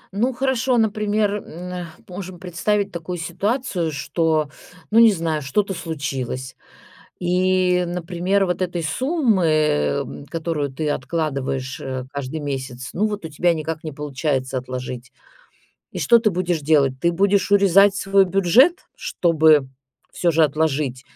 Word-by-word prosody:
Ну, 240 +6 +1
хорошо, 260 -1 0
например, 210 -1 +1
м, - - -7 0.3
а, 180 -1 -5 0.2
можем 185 -1 -7
представить 200 +3 -1
такую 175 +1 -5
ситуацию, 195 0 -2
что, 155 +1 0 0.4
ну, 225 - +5
не 230 -2 +8
знаю, 165 -4 -1
что-то 195 +9 -1
случилось 135 -6 -4 0.6
и, 180 0 +2
например, 180 +3 0
вот 180 0 -2
этой 175 -2 -2
суммы, 250 - +1
м, 140 - 0
которую 155 -3 -3
ты 150 +2 -2
откладываешь, 135 -3 -2
э, 130 -1 -4
каждый 140 +2 -5
месяц, 130 -3 -5
ну 205 - 0
вот 210 -3 -5
у 160 - -5
тебя 170 +3 +2
никак 160 0 -4
не 155 - -5
получается 140 -2 -2
отложить. 125 -1 -6 0.8
И - - -5
что 235 - +5
ты 220 -2 +2
будешь 175 -2 -1
делать? 140 -3 +2
Ты 170 +2 +2
будешь 200 +3 +2
урезать 200 0 +5
свой 195 0 +3
бюджет, 195 - +4 0.2
чтобы 155 -5 +3 0.4
всё 170 -1 +1
же 160 +1 +3
отложить 150 -3 0
170 Hz, 140 wpm, -21 LUFS, 145-195 Hz, 0.8 s, не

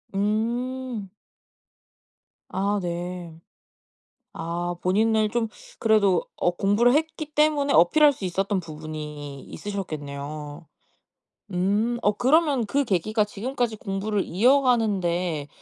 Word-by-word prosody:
음. 230 +1 -2 1.4
아 200 +2 0
네. 175 -1 -5 0.9
아 175 +1 -3
본인을 215 +3 +2
좀 230 -1 0 0.3
그래도 200 -5 +3
어 175 - +2
공부를 205 +7 +3
했기 310 -1 -1
때문에 295 -2 +2
어필할 290 - +6
수 205 - -8
있었던 190 +2 0
부분이 150 -3 -7
있으셨겠네요. 150 -5 -6 0.9
음. 205 +6 +1
어 205 - +3
그러면 275 -1 +3
그 280 +6 +1
계기가 210 +3 +1
지금까지 235 +2 -2
공부를 195 +1 -2
이어가는 235 0 +3
데 170 -4 -1
200 Hz, 220 characters per minute, -25 LUFS, 175-240 Hz, 1.4 s, 어필할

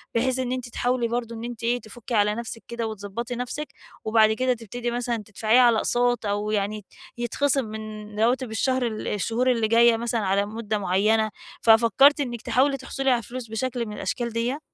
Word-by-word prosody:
بحيث 255 +2 +1
إن 250 -1 -2
أنتِ 255 -1 -3
تحاولي 245 0 0
برضه 235 0 -3
إن 225 - -7
أنتِ 240 -1 -7
إيه 240 +1 +1
تفكّي 235 +2 -9
على 210 0 +3
نفسِك 230 0 -6
كده 235 -1 -3
وتضبطي 220 +3 -5
نفسِك، 250 +5 -4 0.4
وبعد 220 0 +4
كده 255 +3 +1
تبتدي 240 +1 -5
مثلًا 240 0 -1
تدفعيها 220 +4 +3
على 240 -2 +5
أقساط، 245 0 +1
أو 205 +1 -1
يعني 210 0 -2 0.3
يتخصم 265 +3 0
من 215 -1 -7
رواتب 245 +2 +1
الشهر 255 +2 +1
ال 215 -2 -5
الشهور 230 +5 +1
اللي 230 -3 +1
جاية 230 +1 +5
مثلًا 235 0 -1
على 200 0 +1
مُدّة 215 0 -3
مُعيّنة، 210 +3 +2 0.3
ففكرتِ 235 +6 +5
إنك 240 -5 -3
تحاولي 270 +4 +2
تحصلي 270 +1 -2
على 240 -2 +2
فلوس 245 +1 -7
بشكل 235 +1 -2
من 210 - -7
الأشكال 235 +5 -3
ديّة؟ 240 +5 -1
235 Hz, 185 wpm, -25 LUFS, 215-245 Hz, 0.4 s, على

